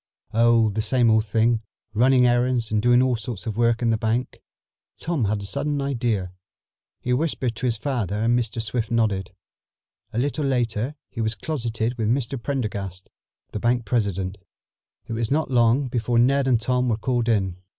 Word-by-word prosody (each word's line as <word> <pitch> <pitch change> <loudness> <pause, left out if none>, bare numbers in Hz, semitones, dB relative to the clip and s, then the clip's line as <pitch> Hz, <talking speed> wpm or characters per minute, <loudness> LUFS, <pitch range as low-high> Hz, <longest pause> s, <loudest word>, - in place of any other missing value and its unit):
"Oh, 115 -1 +4
the 110 +2 -1
same 120 +1 +3
old 110 0 +3
thing. 115 +2 +2 0.3
Running 125 +3 +4
errands 120 -2 +1
and 105 -1 +2
doing 120 +2 +4
all 130 -1 +2
sorts 110 -2 -6
of 110 -3 -3
work 115 +1 +2
in 115 - +3
the 110 - 0
bank." 115 +3 -2 0.6
Tom 160 -8 -1
had 100 0 -1
a - - -6
sudden 145 +8 -1
idea. 120 -9 -1 0.7
He 125 - 0
whispered 130 -4 -1
to 130 - -1
his 115 -2 0
father 115 -6 -2
and 120 +1 +3
Mr. 115 -1 -3
Swift 115 0 -2
nodded. 105 -6 0 0.8
A - - -6
little 145 +4 0
later 125 0 -1 0.2
he 115 - -4
was 110 0 -1
closeted 120 -5 -3
with 110 - 0
Mr. 130 0 -1
Prendergast, 100 -9 -4 0.4
the 105 - -4
bank 120 0 +1
president. 100 -4 -1 0.7
It - - -6
was 115 0 -1
not 150 -1 0
long 120 +2 +3
before 120 -1 -1
Ned 135 +3 +3
and 125 -3 +3
Tom 125 +2 0
were 110 - +1
called 120 0 0
in. 95 -5 +1
120 Hz, 180 wpm, -24 LUFS, 110-125 Hz, 0.8 s, Oh